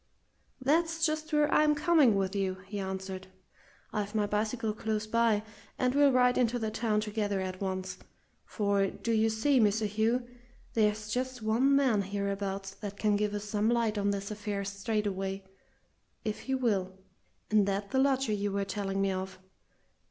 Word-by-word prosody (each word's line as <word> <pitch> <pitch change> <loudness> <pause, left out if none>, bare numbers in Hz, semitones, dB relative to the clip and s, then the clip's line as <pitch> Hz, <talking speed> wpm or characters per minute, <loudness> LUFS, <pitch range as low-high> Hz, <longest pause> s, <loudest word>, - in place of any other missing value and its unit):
"That's 325 +5 +2
just 310 0 -2
where 300 -1 +3
I'm 300 0 +4
coming 295 -6 +4
with 195 0 -1
you," 190 -2 0
he 205 +1 -5
answered. 190 0 -5 0.7
"I've 205 0 -3
my 210 -1 +2
bicycle 215 +2 -1
close 215 0 -2
by, 225 -1 +2 0.3
and 250 0 +1
we'll 285 0 +5
ride 250 -1 +4
into 245 -1 +2
the 220 -2 -2
town 215 -1 0
together 210 -2 -1
at 185 0 -4
once. 190 -1 -3 0.4
For, 200 -2 +1
do 230 - -4
you 220 0 +3
see, 250 +5 +2
Mr. 215 0 +3
Hugh, 225 +4 0 0.5
there's 215 -1 +1
just 255 0 -2
one 245 +6 +3
man 260 -7 +3
hereabouts 200 0 -3
that 205 -1 -6
can 210 -1 +2
give 210 0 0
us 205 - -3
some 210 +1 0
light 230 -2 +1
on 200 0 +1
this 200 +1 -2
affair 205 -1 -3
straightaway 195 -1 -2 0.8
if 215 -1 -2
he 265 - -2
will 195 -7 0 0.5
and 210 -2 +4
that 200 0 -2
the 265 - +2
lodger 270 -4 +2
you 205 0 -1
were 200 0 -1
telling 195 0 -2
me 195 - +1
of. 190 0 -4
210 Hz, 165 wpm, -30 LUFS, 200-240 Hz, 0.8 s, we'll